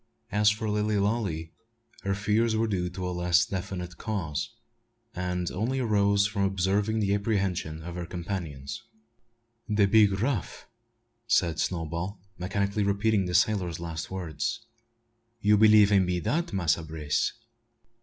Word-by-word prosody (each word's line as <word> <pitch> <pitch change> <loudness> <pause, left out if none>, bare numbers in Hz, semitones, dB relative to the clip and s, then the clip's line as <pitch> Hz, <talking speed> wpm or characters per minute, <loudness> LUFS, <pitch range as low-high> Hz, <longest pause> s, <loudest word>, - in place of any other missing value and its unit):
As 105 +1 +4
for 110 +1 -2
Lilly 105 0 0
Lalee, 100 -6 -1 0.5
her 100 0 -1
fears 110 +3 +1
were 110 +1 +2
due 90 -5 -1
to 90 +1 -5
a - - -2
less 90 0 +3
definite 90 -2 -5
cause, 90 -9 -3 0.6
and 90 -1 -2
only 115 +8 -1
arose 100 -4 +3
from 100 0 -2
observing 100 +3 +1
the 100 -2 +1
apprehension 95 -6 -1
of 85 +1 -6
her 85 -1 -5
companions. 85 -1 -5 0.9
"De 105 -1 +4
big 100 -1 +4
raff," 115 - -2 0.6
said 85 -9 +2
Snowball, 85 +3 -2 0.2
mechanically 100 +3 -1
repeating 100 0 +1
the 90 - -2
sailor's 90 -4 +2
last 80 -1 -5
words. 95 +6 -3 0.7
"You 105 0 +4
b'lieve 105 -1 +6
'im 95 -3 +4
be 90 -1 0
dat, 160 - -1
Massa 85 -4 +1
Brace?" 80 -2 -1
100 Hz, 135 wpm, -28 LUFS, 90-105 Hz, 0.9 s, b'lieve